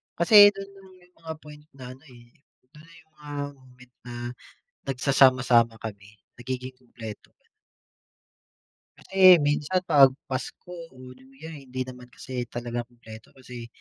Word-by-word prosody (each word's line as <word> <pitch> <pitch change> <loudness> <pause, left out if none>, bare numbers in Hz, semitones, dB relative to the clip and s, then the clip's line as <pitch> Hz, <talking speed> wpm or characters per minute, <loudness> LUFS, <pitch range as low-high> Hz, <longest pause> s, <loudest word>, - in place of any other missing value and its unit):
Kasi 170 +6 +2 0.2
do'n 195 0 -9 0.4
yung 180 - -41
mga 160 -1 -7
point 150 0 -14
na 130 -2 -11
ano, 130 +3 -15
eh, 120 -3 -16 0.5
do'n 150 +1 -17
na 170 - -18
yung 160 - -40
mga 145 -1 -10 0.2
moment 125 -1 -20
na, 120 - -8 0.7
nagsasama-sama 130 -3 +3
kami, 105 -1 -10 0.2
nagiging 130 +1 -6
kumpleto, 115 -4 -11
gano'n. - - -41 1.5
Kasi 195 - -8 0.3
minsan 145 +5 0
'pag 140 -4 +7 0.2
Pasko, 130 +7 -6 0.2
o 130 0 -12
New 130 +1 -20
Year, 160 +2 -9
hindi 130 -3 -7
naman 125 -1 -11
kasi 125 +1 -6
talaga 120 0 -4
kumpleto. 115 -2 -14
Kasi, 125 -2 -10
130 Hz, 140 wpm, -25 LUFS, 120-145 Hz, 1.5 s, pag